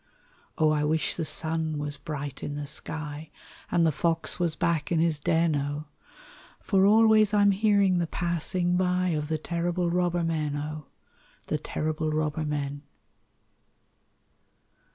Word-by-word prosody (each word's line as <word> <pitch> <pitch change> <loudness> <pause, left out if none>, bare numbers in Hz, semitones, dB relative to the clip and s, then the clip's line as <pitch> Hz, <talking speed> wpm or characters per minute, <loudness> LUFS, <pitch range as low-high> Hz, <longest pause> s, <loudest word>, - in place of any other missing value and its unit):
O! 155 -1 +3
I 150 -1 +1
wish 155 +1 +1
the 165 - -3
sun 160 0 -1
was 145 0 -2
bright 145 -4 -6
in 145 - -4
the 145 0 -4
sky, 150 +1 -5 0.4
And 170 -1 +3
the 160 - +3
fox 165 +3 -1
was 170 -2 0
back 165 -2 0
in 165 - +2
his 160 -2 +1
den, 165 0 +2
O! 145 +1 -3 0.7
For 195 -1 +3
always 215 -1 +5
I'm 205 -1 +5
hearing 200 -2 +3
the 170 - 0
passing 175 +1 0
by 180 0 +1
Of 150 -3 -1
the 160 0 -1
terrible 170 +2 -1
robber 175 -1 +1
men, 155 -3 -1
O! 150 0 -5 0.6
The - - -2
terrible 155 0 -2
robber 155 0 -1
men. 145 -1 -3
160 Hz, 145 wpm, -27 LUFS, 150-175 Hz, 0.7 s, always